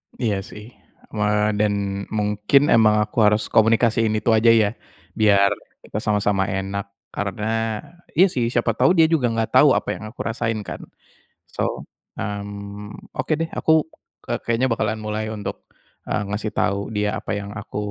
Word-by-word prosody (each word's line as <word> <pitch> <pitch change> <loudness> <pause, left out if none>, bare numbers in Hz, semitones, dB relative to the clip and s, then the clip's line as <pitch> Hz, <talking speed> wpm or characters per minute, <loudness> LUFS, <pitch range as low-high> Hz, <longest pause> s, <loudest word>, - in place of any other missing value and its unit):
Iya, 105 -5 -1
sih, 105 +4 -10 0.4
eee, 105 0 +1
dan, 105 -1 +2 0.3
mungkin 105 +7 +2
emang 110 -2 +5
aku 110 - -11
harus 105 +1 +3
komunikasiin 115 0 +3
itu 110 +2 +1
aja, 110 +1 +3
ya? 110 -3 +5 0.5
Biar 100 -2 +5 0.3
kita 105 - -5
sama-sama 105 -2 +1
enak. 100 +1 -3 0.2
Karena 110 +2 -2 0.3
iya, 185 +5 +6
sih, 120 -6 0
siapa 120 -1 +1
tahu 180 - +4
dia 160 -1 +6
juga 140 -7 +3
nggak 115 -1 -1
tau - - +7
apa - - -1
yang - - -9
aku - - -30
rasain 115 -1 -2
kan? - - -7 0.7
So, - - -2 0.3
mmm, 100 0 -7
oke, - - -3
deh, 165 +1 -3
aku 160 -1 +3 0.4
ke - - -7 0.2
kayaknya 115 +3 +2
bakalan 110 -1 0
mulai 110 0 -3
untuk, 110 -2 -6 0.4
eee, - - -1
ngasih 105 +1 -3
tau 100 +1 0
dia 105 0 -1
apa 110 - -4
yang 100 0 -5
aku 105 -1 -7
110 Hz, 155 wpm, -22 LUFS, 105-115 Hz, 0.7 s, tau